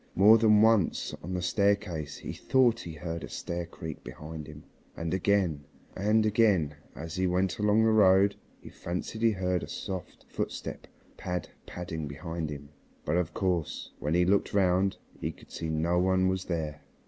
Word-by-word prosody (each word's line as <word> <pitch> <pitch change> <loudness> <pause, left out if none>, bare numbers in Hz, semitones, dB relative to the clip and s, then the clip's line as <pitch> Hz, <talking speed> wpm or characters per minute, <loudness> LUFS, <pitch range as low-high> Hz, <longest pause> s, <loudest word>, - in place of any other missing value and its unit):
More 105 +4 +7
than 105 -1 +5
once 110 -5 +2
on 90 +4 -4
the 90 - -2
staircase 90 -5 0
he - - -6
thought 125 -3 +3
he 85 - -7
heard 80 +1 -5
a - - -7
stair 85 0 -4
creak 80 -2 -8
behind 75 0 -8
him, 75 -1 -11 0.3
and 85 +1 -3
again 95 -6 +1 0.3
and 105 +3 +2
again 100 -9 +3 0.2
as 80 +1 -7
he 95 0 +2
went 90 +1 0
along 105 +1 +4
the 110 - +4
road 100 -1 +5 0.3
he - - -10
fancied 90 +5 -5
he 115 - +5
heard 90 -4 0
a - - -6
soft 95 -3 -6
footstep - - -5 0.3
pad 90 -1 -4 0.2
padding 80 -3 -5
behind 80 +2 -5
him, 70 -1 -8 0.4
but 75 - 0
of 90 -1 -1
course 90 -5 -1
when 75 +3 -1
he 90 0 +4
looked 100 +2 +1
round 95 0 +3 0.2
he - - -2
could - - -18
see 80 - -4
no 85 +3 +1
one 95 0 +3
was 95 0 -1
there. 80 -4 -3
90 Hz, 175 wpm, -29 LUFS, 80-100 Hz, 0.4 s, More